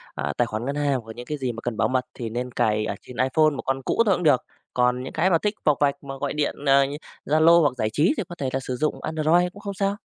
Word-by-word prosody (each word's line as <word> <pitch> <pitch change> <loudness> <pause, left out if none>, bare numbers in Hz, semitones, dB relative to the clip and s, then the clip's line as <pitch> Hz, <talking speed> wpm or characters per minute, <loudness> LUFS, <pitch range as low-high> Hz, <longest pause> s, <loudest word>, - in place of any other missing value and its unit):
à, - - -2
tài 120 - +3
khoản 110 0 -4
ngân 140 +2 -2
hàng 145 -3 +1
hoặc 110 0 -11
những 120 - -8
cái 150 - -4
gì 130 -3 -2
mà 115 0 -8
cần 120 -2 -4
bảo - - +2
mật 130 -1 0
thì 115 -2 -5
nên 125 +2 -4
cài 105 -2 +1
ở 100 - -3
trên 125 - -12
iPhone, 130 +5 +3
1 145 -3 -5
con 135 0 -1
cũ 230 - +2
thôi 200 -3 +4
cũng 180 - -4
được. 145 -6 +3 0.3
Còn 125 0 +1
những 130 - -7
cái 180 +4 +2
mà 170 - +4
thích 210 +5 -1
vọc 150 -3 +4
vạch 140 0 +1
mà 135 -1 -7
gọi 140 +1 -3
điện, 150 -1 -1
à, 140 0 +5
như 140 +2 -5 0.3
Zalo 160 +3 +5
hoặc 145 - +2
giải 110 - 0
trí 150 - +2
thì - - -1
có 175 - -7
thể 135 -6 -2
là 135 - +1
sử 130 -1 -4
dụng 155 +5 -1
Android 160 +3 +2
cũng 205 - -12
không 200 -1 -5
sao. 195 +1 -1
140 Hz, 305 wpm, -24 LUFS, 125-160 Hz, 0.3 s, à